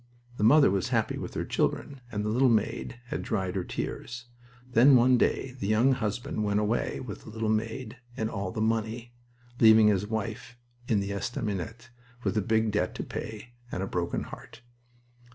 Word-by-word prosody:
The - - -1
mother 140 0 +6
was 95 -2 0
happy - - 0
with - - -6
her - - -2
children, 140 -2 -1
and 105 -1 -2
the - - 0
little 125 +4 +4
maid 115 +2 0
had - - -2
dried 95 -5 -2
her 95 - -1
tears. 120 +6 -5 0.5
Then 130 +4 +7
one 125 +1 +6
day 125 +2 +1
the 100 - -2
young 110 +5 +4
husband 110 -2 -2
went 100 0 +1
away 105 +3 0
with 105 -6 -7
the - - -12
little 110 0 -2
maid 110 +2 -2 0.2
and 110 - 0
all 100 -3 -3
the 110 - -3
money, 115 +2 -1 0.5
leaving 110 -1 +7
his 105 0 +1
wife 115 +2 -4 0.3
in 105 -3 +2
the 100 0 -3
estaminet 105 +2 -4 0.3
with - - 0
a 105 - +2
big 110 +1 +1
debt 95 -3 0
to - - -4
pay 110 +2 -7 0.2
and 90 - -2
a - - -3
broken 85 -2 -2
heart. 115 - -11
110 Hz, 185 wpm, -28 LUFS, 105-120 Hz, 0.5 s, Then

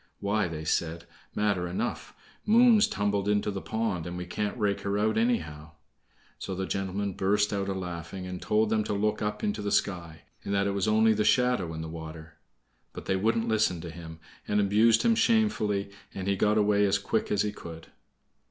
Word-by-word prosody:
"Why," 100 0 0
they 80 -2 -6
said, 80 +1 -1 0.3
"matter 100 -4 0
enough! 85 - -4 0.3
Moon's 230 -1 +5
tumbled 100 0 -1
into 105 0 +1
the 95 -1 -5
pond, 110 -7 -2
and 90 0 -5
we 90 - -5
can't 105 +5 -3
rake 105 -3 0
her 100 0 -1
out 110 +1 +1
anyhow!" 80 - -1 0.7
So 95 - -5
the 95 +1 -2
gentleman 95 +1 -2
burst 105 +3 +1
out 100 -1 -2
a - - 0
laughing, 90 0 -6
and 90 -1 -6
told 105 0 +1
them 110 -1 +2
to - - -2
look 105 +1 0
up 105 0 -3
into 105 +1 -1
the 100 0 -2
sky, 85 -5 -1 0.2
and 100 - -2
that 100 0 +2
it 100 - 0
was 100 0 -1
only 110 +1 +4
the 105 0 0
shadow 120 -5 +2
in 80 - -5
the - - -5
water. 80 -1 -9 0.5
But - - -8
they 95 - 0
wouldn't 115 +4 +1
listen 110 -6 +1
to 85 - -7
him, 80 -1 -10 0.3
and 105 - +1
abused 110 +3 +4
him 230 - +4
shamefully, 210 - +1 0.2
and 95 0 -4
he 100 - +2
got 105 +2 +2
away 105 -1 +3
as 100 +1 +2
quick 105 +2 -1
as 100 - +2
he 105 - -1
could. 85 -5 -10
100 Hz, 200 wpm, -28 LUFS, 90-105 Hz, 0.7 s, Moon's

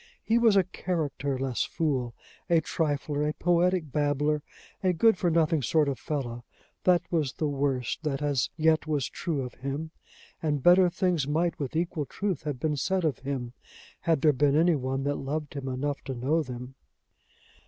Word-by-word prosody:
He 230 +1 +3
was 225 -3 +5
a 195 - +5
characterless 140 -8 -2
fool, 130 -7 -1 0.3
a 170 -1 +5
trifler, 145 -2 -1
a - - -2
poetic 175 -2 +2
babbler, 145 +1 +1 0.4
a 185 -1 +3
good 225 +6 +4
for 180 -1 0
nothing 160 -1 +2
good 130 - -3
sort 155 -2 +3
of 140 -2 -2
fellow; 120 -5 -4 0.4
that 175 -2 +4
was 155 -6 0
the 155 - -1
worst 135 -3 -1
that 145 -4 -2
as 145 -4 0
yet 160 0 +3
was 145 -4 0
true 155 -6 -3
of 125 - -7
him; 140 +4 -4 0.5
and 150 -4 -1
better 180 +1 +7
things 175 -5 0
might 165 +3 0
with 140 0 -4
equal 165 -3 -1
truth 195 -7 -2
have 145 -4 -3
been 150 0 0
said 190 +4 0
of 155 - 0
him, 130 -3 -4 0.5
had 165 -4 +1
there 150 0 +5
been 145 +1 +2
any 170 +3 +4
one 135 0 -2
that 145 0 0
loved 145 +2 -4
him 140 -2 -5
enough 140 +2 -2
to 135 - -4
know 140 +7 +1
them. 125 -2 -7
150 Hz, 180 wpm, -28 LUFS, 135-165 Hz, 0.5 s, better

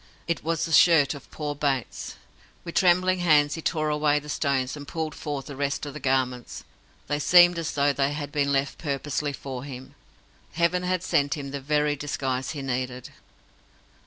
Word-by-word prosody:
It 170 - -1
was 165 +1 0
the 165 - -6
shirt 160 -3 +6
of 140 -2 -12
poor 150 -1 -4
Bates. 140 -3 -2 0.5
With 170 - -7
trembling 185 0 +3
hands 150 -4 +4
he 165 - -5
tore 155 -1 0
away 150 0 +2
the 150 0 -6
stones, 140 -3 0
and 145 -1 -9
pulled 160 -2 -3
forth 145 -3 -5
the 145 - -8
rest 140 +1 -2
of 145 - -7
the 150 - -7
garments. 130 -3 -1 0.4
They 145 +1 -1
seemed 175 +2 +6
as 165 - -3
though 145 0 +2
they 140 +1 +1
had 145 -1 -5
been 140 -1 0
left 135 0 0
purposely 145 0 -2
for 130 -2 -7
him. 130 -2 -9 0.6
Heaven 170 +2 +1
had 180 -1 -1
sent 140 -5 +1
him 140 -2 -6
the 140 0 -5
very 150 +1 +1
disguise 135 -2 -3
he 145 -3 -6
needed. 125 -1 -4
145 Hz, 185 wpm, -26 LUFS, 140-155 Hz, 0.6 s, shirt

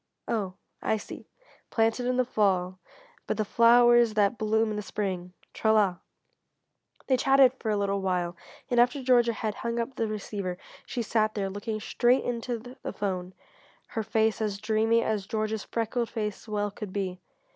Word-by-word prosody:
"Oh 200 -5 -2 0.3
I 220 - +1
see; 205 - -9 0.4
planted 225 +2 +1
in 250 0 +1
the 255 - +3
fall 185 -5 +1 0.5
but - - -1
the 215 - 0
flowers 235 0 +5
that 205 +1 +3
bloom 220 0 +1
in - - -3
the 210 - -2
spring 185 -3 -4 0.2
tra 220 - +2
la." 200 -5 +3 1.1
They 260 - +3
chatted 270 0 +5
for 220 - -3
a 210 - +1
little 200 0 0
while 180 -2 -1 0.4
and 245 - +3
after 250 +3 +3
Georgia 240 -2 +4
had 215 -1 -3
hung 235 0 -2
up 235 +3 -2
the 225 - 0
receiver 200 -3 -4 0.3
she 240 - -2
sat 215 0 +1
there 195 -2 -2
looking 215 +2 -4
straight 245 +4 +2
into 240 0 -2 0.2
the - - -4
phone 185 -2 -3 0.5
her 225 - -2
face 220 +1 +1
as 210 -2 -1
dreamy 225 +2 +2
as 210 -3 -1
Georgia's 215 -1 -2
freckled 230 +1 -2
face 210 -2 -4
well 205 -1 -1
could 205 -1 -7
be. 185 -2 -3
215 Hz, 170 wpm, -28 LUFS, 200-235 Hz, 1.1 s, flowers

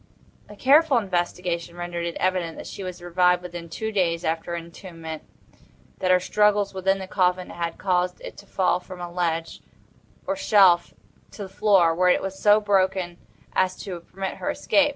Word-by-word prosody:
A 210 - -11
careful 280 +4 +4
investigation 175 -4 -2
rendered 175 -1 -4
it 170 - -5
evident 185 -3 -1
that - - -8
she - - -8
had 185 -1 -6
revived 180 0 +2
within 175 -1 -8
two 220 +7 -4
days 175 -4 0
after 165 +1 -2
her 170 - -2
entombment; 165 -2 -8 0.8
that 185 - 0
her 185 0 +5
struggles 205 +1 +2
within 190 +1 +1
the 190 - -6
coffin 180 -1 0
had 170 -1 -4
caused 180 -1 0
it - - -9
to 200 - -13
fall 185 -2 +1
from 180 0 -11
a 175 -1 -6
ledge, 165 -2 -2 0.6
or 290 - -1
shelf 195 -10 +4 0.4
to 205 - -7
the 190 - -8
floor, 190 -6 +4
where 180 +2 +3
it - - +3
was 195 0 -5
so 210 0 +5
broken 190 -4 0 0.3
as 185 0 +1
to 185 -4 -6
permit 190 +3 -6
her - - -3
escape. 295 0 +2
180 Hz, 180 wpm, -24 LUFS, 175-195 Hz, 0.8 s, her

